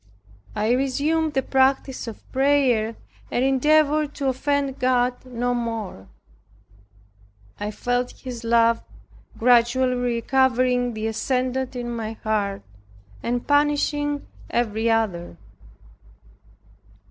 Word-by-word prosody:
I 215 +2 +1
resumed 290 +5 +1
the 265 - +2
practice 265 -1 +1
of 225 - -9
prayer, 260 -5 +2 0.3
and 250 - +1
endeavored 300 +2 +3
to 275 -2 0
offend 275 +1 -1
God 250 -1 +1
no 245 0 -1
more. 225 - -4 1.5
I 205 0 -3
felt 245 +3 -1
His 245 -3 -8
love 230 0 +3 0.6
gradually 245 +2 +4
recovering 245 0 +1
the 215 0 -3
ascendant 255 +3 -1
in 240 -1 -4
my 225 -1 -4
heart, 205 -2 -1 0.6
and 240 0 -2
banishing 290 0 +1 0.2
every 225 -1 0
other. 190 - -1
250 Hz, 100 wpm, -23 LUFS, 230-270 Hz, 1.5 s, gradually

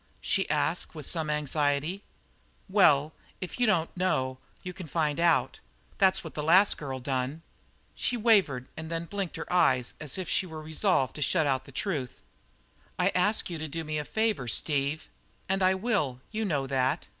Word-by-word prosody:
she - - 0
asked - - 0
with - - -7
some 160 -3 -1
anxiety. 150 +4 0 0.7
"Well, 145 +2 +4 0.3
if 185 +6 -6
you 245 - +3
don't 170 -6 +1
know 130 -8 0 0.2
you 180 -1 -5
can 180 -2 -8
find 155 -1 0
out. 160 -7 +2 0.4
That's 190 -1 +4
what 160 - -8
the 150 - -3
last 185 +7 +5
girl 135 -3 -4
done." 130 +4 -3 0.5
She 245 - -1
wavered, 195 - +3
and 160 0 -7
then 165 0 -3
blinked 195 -1 -4
her - - -5
eyes 130 -9 +3
as 150 +1 -4
if 185 -2 -4
she 185 - 0
were 160 -2 -7
resolved 155 -3 +1
to - - -6
shut 150 +3 +2
out 135 -2 0
the - - -13
truth. 140 - -3 0.8
"I - - +3
asked 185 +1 +1
you 165 - -4
to 155 - -3
do 165 +2 -4
me 155 -1 -2
a - - -3
favour, 215 - -1
Steve." 140 +4 0 0.4
"And 190 +1 0
I 185 0 +4
will. 190 - 0
You 220 0 -2
know 145 -8 0
that." 135 +3 0
160 Hz, 180 wpm, -28 LUFS, 140-185 Hz, 0.8 s, last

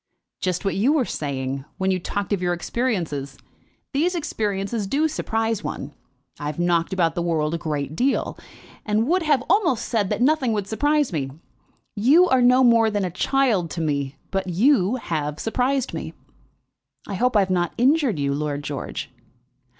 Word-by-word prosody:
"Just 185 +1 -2
what 195 - +1
you 240 +9 +3
were 285 -6 +2
saying, 135 -4 -3
when 190 0 +1
you 185 - 0
talked 205 +3 -3
of 195 - -1
your 175 -1 +1
experiences. 170 - -2 0.6
These 340 +6 +1
experiences 205 - -2
do 295 +9 +2
surprise 225 -7 -1
one. 145 +2 -5 0.5
I 145 - -4
have 150 - -4
knocked 175 -1 +1
about 175 -3 +1
the 175 - -2
world 160 -2 0
a 170 - -2
great 150 -2 -3
deal, 265 +9 0 0.5
and 215 +1 +1
would 365 +4 +2
have 295 -5 +2
almost 340 - +2
said 210 -5 0
that - - -1
nothing 260 -2 +2
would 205 -2 -1
surprise 290 +3 +1
me. 140 -4 -2 0.6
You 280 - +5
are 260 -1 +4
no 250 +1 +5
more 230 -2 +5
than 205 -2 -1
a 180 - -3
child 215 -3 +1
to - - -1
me, 140 -3 -1 0.2
but 195 -1 -1
you 210 - +3
have 150 - -3
surprised 255 +3 0
me." - - -5 0.9
"I 205 - -5
hope 240 +3 +2
I - - +6
have 190 -1 -1
not 175 -2 0
injured 265 - +3
you, 140 -1 0
Lord 145 0 -2
George." 145 -2 -5
200 Hz, 175 wpm, -23 LUFS, 165-255 Hz, 0.9 s, I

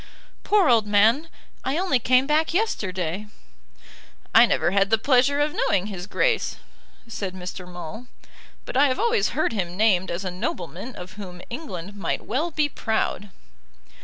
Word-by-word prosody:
"Poor 405 -4 +3
old 230 -4 +4
man! 225 +10 +3 0.3
I 270 +4 -1
only 355 -8 +2
came 255 +2 +3
back 310 +3 +1
yesterday." 190 - -1 1.1
"I 230 +2 +8
never 175 - +1
had 195 0 +2
the 225 - +4
pleasure 265 +4 +3
of 295 +1 +1
knowing 195 -1 +1
his 190 -3 -6
Grace," 460 - +1 0.5
said 200 -4 -5
Mr. 180 0 -7
Maule. 175 +7 -8 0.6
"But - - -7
I 285 +2 +5
have 255 - 0
always 460 -2 +2
heard 310 - +1
him 180 -4 -3
named 195 -4 +3
as 180 +3 -3
a 185 - -2
nobleman 185 - -5
of 185 +2 -10
whom 180 -2 -9
England 200 - -6
might 200 - -3
well 285 +10 -1
be 305 -2 +1
proud." 220 -6 -2
220 Hz, 160 wpm, -24 LUFS, 185-285 Hz, 1.1 s, I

